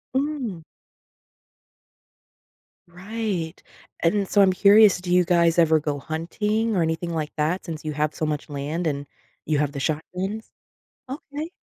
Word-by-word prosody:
Mm. 265 - -2 2.3
Right. 185 -2 -4 0.4
And 195 +3 +2
so, 205 - +4
I'm 190 -1 +5
curious, 205 -1 +6
do 180 -1 -1
you 180 0 +5
guys 170 -1 +3
ever 160 -1 +5
go 145 -1 -3
hunting 210 +9 -1
or 175 - +2
anything 165 +1 -1
like 155 -1 -2
that 160 +5 -1
since 160 -3 -6
you 155 - -2
have 150 +1 -1
so 155 - -1
much 150 0 -3
land 150 +4 -3
and 140 -1 -2 0.4
you 155 -2 +1
have 145 -1 0
the 140 - -4
shotguns? 185 +9 -3 0.6
Okay. 295 +4 -6
170 Hz, 145 wpm, -24 LUFS, 155-205 Hz, 2.3 s, curious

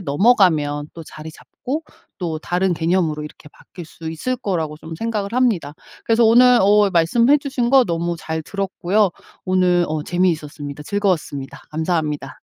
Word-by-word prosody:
넘어가면 155 - +2
또 165 - -9
자리 155 0 -10
잡고 275 - -6 0.4
또 165 -4 -3
다른 180 +1 0
개념으로 165 -2 0
이렇게 150 0 -12
바뀔 175 -4 -12
수 160 0 -8
있을 255 +11 -3
거라고 160 -8 -3
좀 160 +1 -9
생각을 215 -1 -3
합니다. 220 - +1 0.3
그래서 230 0 +3
오늘 245 +2 +6
어 205 0 +4
말씀해 230 - +3
주신 265 -4 -2
거 265 -2 +6
너무 170 -1 -2
잘 160 0 -4
들었고요. 195 +2 0 0.4
오늘 180 -1 +2
어 155 -1 -2
재미있었습니다. 150 -5 -2
즐거웠습니다. 170 -8 -2
감사합니다. 155 -4 -2
175 Hz, 355 characters per minute, -20 LUFS, 155-210 Hz, 0.4 s, 오늘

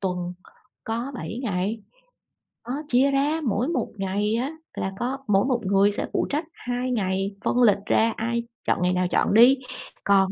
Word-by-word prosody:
tuần 180 -2 -2 0.5
có 235 +5 -3
7 235 -2 -5
ngày, 205 0 -1 0.9
đó, 275 +5 -3
chia 265 +2 +4
ra, 290 +4 +1
mỗi 235 0 0
một 335 - -1
ngày 200 +3 0
á 255 +5 -1 0.2
là 190 - -2
có 255 +3 -1
mỗi 200 0 +3
một 250 -3 0
người 200 +1 +4
sẽ 205 - -3
phụ - - +1
trách 295 +3 -1
2 250 +1 -3
ngày, 195 -3 -1
phân 250 - +2
lịch 210 -4 +6
ra 225 +1 +3
ai 235 +1 -1 0.2
chọn - - +1
ngày 180 0 +2
nào 180 0 +1
chọn - - +2
đi, 245 +5 +7 0.5
còn 195 -1 +4
225 Hz, 180 wpm, -25 LUFS, 195-250 Hz, 0.9 s, đi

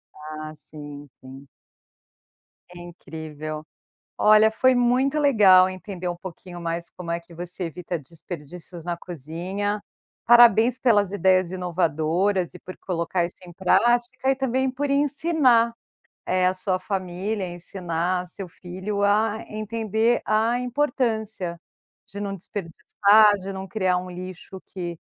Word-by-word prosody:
Ah, 155 0 -8
sim, 145 -1 -11
sim. 135 +1 -12 1.3
Incrível. 155 -3 -8 0.5
Olha, 215 +1 +6
foi 255 +3 +3
muito 250 +4 +2
legal 195 -10 +6
entender 185 -1 -6
um 175 - -3
pouquinho 175 0 -9
mais 170 0 -4
como 170 -2 -7
é 170 - -1
que 170 0 -17
você 175 +2 -6
evita 175 +1 -4
desperdícios 165 +2 -10
na 175 -1 -3
cozinha. 180 +6 -4 0.4
Parabéns 240 0 +6
pelas 205 -7 +3
ideias 185 -2 +2
inovadoras 180 +1 0
e 180 - -11
por 185 - -10
colocar 170 0 -1
isso 175 - -8
em 175 - -11
prática, 240 +8 +2
e 270 - +3
também 265 0 0
por 280 +3 -3
ensinar, 280 -4 +3 0.5
eh, 185 0 +2
a 185 - +2
sua 185 0 -1
família, 190 +1 -3
ensinar 175 0 -3
seu 185 +2 -7
filho 190 +4 -4
a 215 +2 +2
entender 220 +2 0
a 225 +3 +2
importância 225 - -1 0.5
de 200 - -8
não 200 -1 -3
desperdiçar, 205 +3 +3
de 195 +1 -5
não 190 0 -6
criar 185 -3 +1
um 180 0 -5
lixo 185 +1 -8
que 175 -3 -6
185 Hz, 130 wpm, -24 LUFS, 175-220 Hz, 1.3 s, Olha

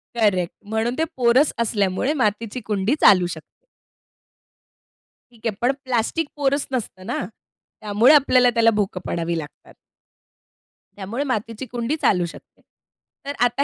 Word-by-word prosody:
Correct, 190 -6 +1
म्हणून 220 +3 -1
ते 320 - +1
पोरस 255 +4 +3
असल्यामुळे 210 +4 0
मातीची 230 -2 -1
कुंडी 210 +5 0
चालू 185 -3 +6
शकते. 170 - -11 1.7
ठीक 230 -1 -7
आहे, 210 - -2
पण 250 +2 +3
प्लास्टिक 260 +5 -1
पोरस 280 0 0
नसतं 185 -6 -4
ना? 230 -5 -3 0.6
त्यामुळे 215 +7 +4
आपल्याला 255 -4 +5
त्याला 230 -1 +3
भोकं 195 -3 -1
पाडावी 170 0 -2
लागतात. 150 -2 -9 1.2
त्यामुळे 210 +8 -4
मातीची 230 -2 -3
कुंडी 240 +5 -2
चालू 180 -3 +2
शकते. 165 - -13 0.6
तर 285 - -3
आता 245 +4 +1
230 Hz, 130 wpm, -22 LUFS, 200-255 Hz, 1.7 s, चालू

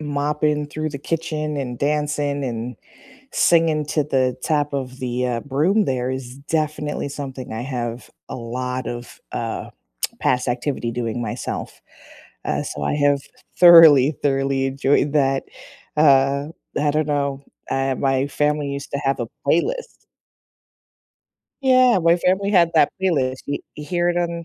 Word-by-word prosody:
mopping 150 0 0
through 155 +1 -4
the 140 - -6
kitchen, 155 -1 -3
and 125 -3 -4
dancing, 145 -1 -1
and 120 -1 -4 0.6
singing 160 -3 +3
to 150 -1 +1
the 130 -3 +1
top 145 -2 0
of 130 -1 -4
the, 125 0 -2
uh, 120 -1 -1
broom 160 - +1
there 125 -1 -1
is 130 -1 -6
definitely 150 0 -2
something 135 -2 -7
I 110 - -4
have 120 -2 -4 0.2
a - - -6
lot 125 +2 -4
of, 120 0 -7
uh, - - -4 0.5
past 125 0 +1
activity 120 -1 -2
doing 120 0 -3
myself, 115 - -5 0.6
uh, - - -1
so 75 - -6
I 70 - 0
have 145 -1 +2 0.4
thoroughly, 160 -6 +9
thoroughly 135 -1 +1
enjoyed 140 +2 +1
that, 135 -2 +2 0.5
uh, 140 -1 +4 0.3
I 145 0 +2
don't 155 0 0
know, 140 -2 -1 0.3
uh, 135 0 0
my 135 +1 +1
family 150 0 0
used 140 0 -6
to - - -1
have 135 0 0
a 120 - -2 0.2
playlist. 485 - -1 1.6
Yeah, 255 -4 +5
my 170 0 +4
family 190 +3 +1
had 175 -4 +4
that 155 -3 +4
playlist, 130 -8 0
y 145 - -1 0.2
you 150 - -8
hear 175 +2 0
it 175 - 0
on 170 -1 -2
140 Hz, 145 wpm, -21 LUFS, 130-155 Hz, 1.6 s, thoroughly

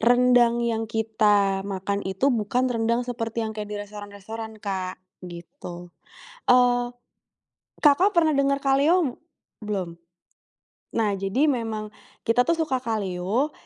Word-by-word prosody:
rendang 240 0 +4
yang 225 -1 -1
kita 210 -3 +2
makan 200 +1 -2
itu 190 +9 +1
bukan 245 +3 0
rendang 235 +1 +1
seperti 230 -2 -3
yang 220 - -4
kayak 210 -1 -6
di 210 - -5
restoran-restoran, 210 +2 -8
Kak, 190 -2 -3 0.3
gitu. 175 0 -10 0.6
Eee, 245 -1 +4 0.9
Kakak 315 +7 +5
pernah 315 -2 +4
denger 275 0 +2
kalio 280 +2 +2 0.4
belum? 185 -5 -3 1.0
Nah, 210 -3 +2
jadi 195 +10 +1
memang 225 -4 -3 0.4
kita 230 +2 +4
tuh 335 - +3
suka 300 -5 0
kalio, 210 +4 -1
225 Hz, 120 wpm, -25 LUFS, 200-250 Hz, 1.0 s, Kakak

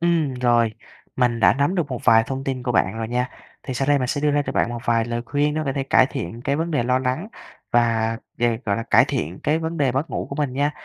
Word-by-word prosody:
Ừm, 165 -6 +1
rồi. 120 -3 +2 0.4
Mình 120 -2 +1
đã - - +6
nắm 140 +7 +1
được 170 -5 0
một 125 - -3
vài 115 -2 +6
thông 135 0 -4
tin 130 -2 -3
của 125 -1 -1
bạn 95 +3 +1
rồi 110 0 -3
nha. 125 +1 -1 0.3
Thì 130 - -5
sau 135 +2 -1
đây 145 -1 +4
mình 125 - -1
sẽ 145 +2 -2
đưa 150 0 +2
ra 145 0 +2
cho - - -2
bạn - - +1
một 120 - -4
vài 115 -1 +2
lời 120 0 -3
khuyên 150 +1 0
để 155 - -1
có 135 - -1
thể 135 - -2
cải 130 -1 +4
thiện 115 0 -6
cái 140 +1 0
vấn 165 +1 -2
đề 145 -6 +1
lo 125 +2 +2
lắng 130 +10 -2 0.4
và 115 -1 +2 0.2
về, 120 -1 +1
gọi 100 -2 0
là, 115 - -2
cải - - +5
thiện 85 +5 -4
cái 155 +2 +1
vấn 165 +1 -4
đề 135 -4 +1
mất 135 +5 -2
ngủ - - -3
của - - -5
mình 145 -4 -1
nha. 145 +2 +1
130 Hz, 280 wpm, -22 LUFS, 120-145 Hz, 0.4 s, đã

